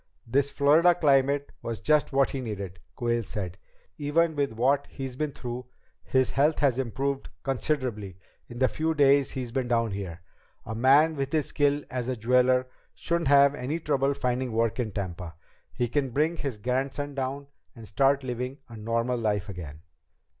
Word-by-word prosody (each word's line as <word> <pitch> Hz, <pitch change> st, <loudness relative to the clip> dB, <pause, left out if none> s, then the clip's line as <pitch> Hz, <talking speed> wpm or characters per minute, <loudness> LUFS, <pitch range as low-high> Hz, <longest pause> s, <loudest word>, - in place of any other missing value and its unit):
"This 135 Hz, +4 st, +1 dB
Florida 160 Hz, +6 st, +4 dB
climate 140 Hz, -2 st, +2 dB
was 115 Hz, -2 st, -4 dB
just 150 Hz, -1 st, +2 dB
what 135 Hz, 0 st, +2 dB
he 135 Hz, -, -3 dB
needed," 100 Hz, -6 st, -6 dB, 0.2 s
Quayle 120 Hz, -1 st, 0 dB
said. 95 Hz, -4 st, -5 dB, 0.4 s
"Even 160 Hz, +2 st, +1 dB
with 140 Hz, -3 st, 0 dB
what 135 Hz, +5 st, +1 dB
he's 135 Hz, -2 st, -6 dB
been 150 Hz, +2 st, -2 dB
through, 125 Hz, -1 st, -6 dB, 0.3 s
his 130 Hz, -1 st, +1 dB
health 150 Hz, +3 st, +2 dB
has 135 Hz, -4 st, +2 dB
improved 135 Hz, +2 st, -2 dB
considerably 125 Hz, -, -2 dB, 0.3 s
in 120 Hz, -, -10 dB
the 130 Hz, +1 st, +3 dB
few 160 Hz, +3 st, -1 dB
days 140 Hz, -2 st, +4 dB
he's 125 Hz, -3 st, -5 dB
been 130 Hz, 0 st, -1 dB
down 115 Hz, -2 st, +1 dB
here. 95 Hz, -3 st, -6 dB, 0.4 s
A 110 Hz, -, -5 dB
man 140 Hz, +7 st, +4 dB
with 135 Hz, -1 st, -3 dB
his 155 Hz, -2 st, +1 dB
skill 145 Hz, 0 st, +1 dB
as 125 Hz, -2 st, -3 dB
a 130 Hz, -, -1 dB
jeweler 125 Hz, +2 st, +3 dB, 0.3 s
shouldn't 170 Hz, -2 st, -1 dB
have 140 Hz, 0 st, +6 dB
any 145 Hz, +4 st, -3 dB
trouble 140 Hz, -3 st, +1 dB
finding 125 Hz, 0 st, -1 dB
work 115 Hz, +1 st, 0 dB
in 120 Hz, -3 st, 0 dB
Tampa. 90 Hz, -4 st, -5 dB, 0.4 s
He 120 Hz, -, -1 dB
can 135 Hz, +2 st, 0 dB
bring 155 Hz, +7 st, 0 dB
his 140 Hz, -7 st, -4 dB
grandson 135 Hz, +5 st, -2 dB
down, 135 Hz, +1 st, -3 dB, 0.3 s
and 115 Hz, -2 st, -11 dB
start 135 Hz, +6 st, +2 dB
living 125 Hz, +1 st, -4 dB
a 115 Hz, -, -10 dB
normal 115 Hz, +3 st, -1 dB
life 105 Hz, -3 st, -1 dB
again." 80 Hz, -5 st, -8 dB
130 Hz, 170 wpm, -27 LUFS, 115-140 Hz, 0.4 s, have